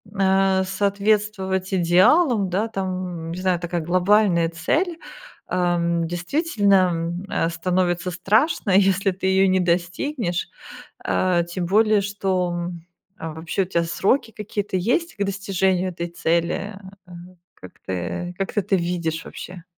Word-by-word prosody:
а, 190 0 +3
соответствовать 200 0 0
идеалам, 190 - +4
да, 205 +5 0
там, 185 -5 -4
не 180 - -5
знаю, 185 -2 +1
такая 175 -1 -3
глобальная 180 0 +3
цель, 320 - -1 0.5
ам, 170 -2 0
действительно, 200 - +1 0.2
м, 170 +2 -3
э, 165 - 0
становится 180 +1 -1
страшно, 210 - +1
если 195 0 +3
ты 185 +1 -6
ее 190 0 +4
не 185 0 +3
достигнешь, 175 - -1 0.6
э, 180 -2 +1
тем 175 0 -3
более, 215 +2 +4
что, 195 -3 -1
м 175 -1 -5 0.4
Вообще 160 +4 -3
у - - 0
тебя 170 -2 0
сроки 190 +9 +1
какие-то 205 -2 -3
есть 330 - 0
к 205 - -3
достижению 190 -2 0
этой 170 0 -5
цели, 170 +4 -1 0.3
э, - - -18 0.4
как 95 - -13
ты 95 - -4
как 195 - -3
ты 210 - +2
это 195 0 +1
видишь 170 -2 -2
вообще? 180 -1 -9
185 Hz, 135 wpm, -22 LUFS, 175-200 Hz, 0.6 s, идеалам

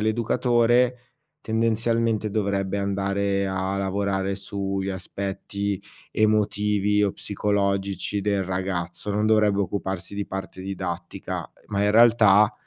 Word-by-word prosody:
l'educatore, 120 +2 +2 0.4
tendenzialmente 115 -1 +1
dovrebbe 100 -2 -1
andare 100 0 0
a 95 0 -2
lavorare 100 0 -1
sugli 100 -1 -3
aspetti 100 +1 -3 0.3
emotivi 105 -1 +2
o 100 - 0
psicologici 100 -1 -1
del 100 -1 0
ragazzo. 90 +1 -3
Non 105 +1 +1
dovrebbe 105 -2 +3
occuparsi 95 -1 -3
di 100 - -2
parte 95 -1 -6
didattica, 95 -2 -5 0.2
ma 100 -1 0
in 105 - +3
realtà 110 -3 +6
100 Hz, 105 wpm, -24 LUFS, 95-105 Hz, 0.4 s, realtà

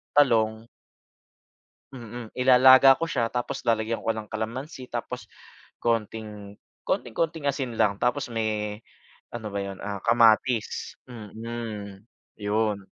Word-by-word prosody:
talong. 110 -5 +3 1.3
Mm, 120 -2 -9
ilalaga 130 +1 +7
ko 165 - -1
siya 120 -8 -1
tapos 125 +3 -3
lalagyan 115 -1 0
ko - - -3
ng 110 -1 -2
kalamansi, 125 +4 -5
tapos - - -5 0.5
konting 105 -3 -3 0.2
konting 120 - -2
konting 160 -1 -2
asin 135 -4 -2
lang. 100 -1 +1
Tapos 125 +3 +1
may 105 -1 -2 0.5
ano 110 -2 -6
ba 100 - -1
yun, 100 -1 -6
ah 100 -2 -4
kamatis, 115 0 +2
mm, 110 -3 -7 0.4
yun. 105 -1 -1
115 Hz, 115 wpm, -26 LUFS, 105-125 Hz, 1.3 s, ilalaga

